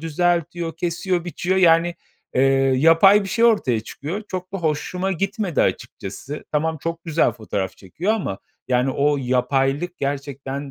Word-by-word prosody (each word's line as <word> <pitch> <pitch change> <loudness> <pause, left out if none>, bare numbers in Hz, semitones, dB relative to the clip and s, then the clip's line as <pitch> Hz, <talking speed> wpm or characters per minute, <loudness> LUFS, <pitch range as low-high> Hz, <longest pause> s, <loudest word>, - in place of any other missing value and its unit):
düzeltiyor, 170 +1 -1
kesiyor, 175 +1 -1
biçiyor. 175 +2 -1
Yani, 170 -1 +4 0.4
eee, 130 - +3 0.3
yapay 165 +8 +6
bir 195 - -5
şey 230 +5 +2
ortaya 205 - +3
çıkıyor. 155 - -6
Çok 185 0 -5
da 195 - -3
hoşuma 180 +4 -1
gitmedi 195 -1 -1
açıkçası. 135 +9 -4
Tamam, 160 +1 0
çok 165 0 -4
güzel 165 -1 +2
fotoğraf 100 -4 -4
çekiyor 165 - -2
ama 185 - -3 0.3
yani 125 +1 +2
o 145 +2 +2
yapaylık 135 +6 0
gerçekten 140 0 -4
165 Hz, 140 wpm, -22 LUFS, 140-180 Hz, 0.4 s, yapay